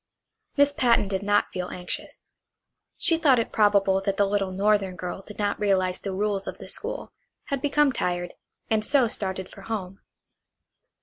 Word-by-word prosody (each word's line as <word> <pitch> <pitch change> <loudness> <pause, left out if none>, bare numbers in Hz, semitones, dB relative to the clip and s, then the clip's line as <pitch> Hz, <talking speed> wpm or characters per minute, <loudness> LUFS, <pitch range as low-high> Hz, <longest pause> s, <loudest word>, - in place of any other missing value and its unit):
Miss 285 0 +5
Patten 235 -6 +3
did 195 -1 -2
not 205 0 +2
feel 180 -1 -3
anxious. 180 -1 -6 0.7
She 330 -1 +3
thought 280 -6 +5
it 230 - -1
probable 200 -2 +3
that 195 0 -1
the 205 - +4
little 195 -1 0
northern 195 -1 +1
girl 180 +1 -5
did 210 +1 -12
not 205 -1 -1
realize 185 -3 +1
the 195 - -4
rules 200 0 -1
of - - -5
the - - -10
school, - - -4 0.4
had 275 -2 -1
become 290 0 +3
tired, 175 -6 -2 0.3
and 220 -1 +1
so 265 +1 +3
started 190 -3 -3
for 195 - -13
home. 195 -3 -5
200 Hz, 170 wpm, -26 LUFS, 190-225 Hz, 0.7 s, Miss